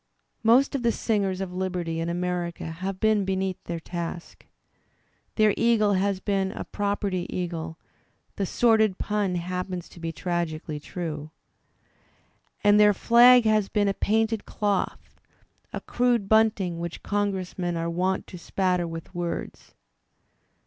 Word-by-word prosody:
Most 240 +5 +4
of 275 - -1
the 235 -1 +2
singers 200 -5 -1
of 185 -2 -4
liberty 180 -3 -2
in 165 +1 -2
America 175 0 -2
have 185 +4 -5
been 215 -2 +3
be 190 0 -1
neath 190 -1 -3
their 170 -1 -4
task. 170 0 -6 0.9
Their 215 -2 +4
eagle 225 -3 +3
has 195 0 +1
been 195 -1 0
a - - -5
"property" 200 -3 -2
eagle 165 -2 -4 0.6
(the 195 - -1
sordid 220 -4 +3
pun 205 -3 -1
happens 180 0 -4
to - - -14
be 165 -1 -3
tragically 165 -4 -3
true), 155 -2 -5 1.3
and 205 0 +6
their 210 -1 +6
flag 240 +2 +7
has 215 -2 +2
been 205 -1 +1
a 200 - +2
painted 220 +2 0
doth, 205 -2 -2 0.5
a - - -4
crude 240 -4 +1
bunting 210 -6 +2
which 170 0 -6
Congressmen 190 -4 -2
are 165 0 -2
wont 185 +3 -1
to 180 - -10
spatter 180 0 0
with 165 +1 -8
words. 175 -1 -5
190 Hz, 140 wpm, -26 LUFS, 175-210 Hz, 1.3 s, flag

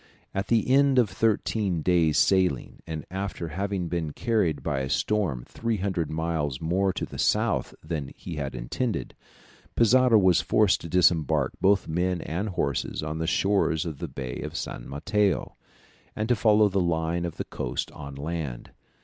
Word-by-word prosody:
At 95 +1 -2
the 115 -2 +2
end 135 +1 +4
of 120 -5 +4
thirteen 105 -5 0
days' 80 -4 +3
sailing, 90 -6 +2
and 80 -2 -5
after 95 -3 -4
having 95 +2 -2
been 80 -3 -3
carried 105 -10 0
by 70 -4 -1
a 65 0 -3
storm 85 - 0
300 100 -8 -2
miles 80 -4 -2
more 95 +4 +1
to 95 - -3
the - - -10
south - - +1
than 75 -4 -4
he 85 - -7
had 70 -3 -4
intended, 105 - -3 0.6
Pizarro 125 0 +5
was 95 -4 +4
forced 105 -4 +3
to 85 - -7
disembark 85 -3 +3
both 100 0 +3
men 90 +2 0
and 95 +7 -3
horses 70 -6 -2
on 75 +1 -4
the 80 - -1
shores 95 -4 +1
of 80 -4 -5
the - - -4
Bay 65 -2 -6
of - - -5
San - - -6
Mateo, 105 +8 0 0.6
and 110 - -2
to 125 - +4
follow 105 0 +4
the 100 -1 0
line 85 0 0
of 85 -2 -4
the - - -3
coast - - -4
on 70 -2 -9
land. 70 -4 -5
85 Hz, 165 wpm, -26 LUFS, 75-100 Hz, 0.6 s, Pizarro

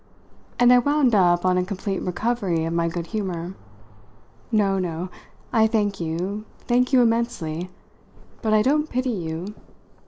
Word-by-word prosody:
And 245 0 +6
I 250 - +7
wound 285 -1 +2
up 175 -3 +4
on 180 0 +3
a - - +1
complete 195 +1 -3
recovery 185 -3 -1
of 165 - -2
my 170 0 +1
good 170 0 -3
humour. 180 -3 -4 1.0
"No, 195 -3 +2
no. 175 0 -3 0.4
I 220 -2 +5
thank 205 -3 0
you 180 +6 -3 0.2
thank 250 +1 +1
you 255 -2 +6
immensely. 225 -8 -1 0.7
But 220 - 0
I 215 0 +4
don't 300 +4 +1
pity 255 0 -1
you. 175 0 -4
200 Hz, 150 wpm, -23 LUFS, 175-235 Hz, 1.0 s, I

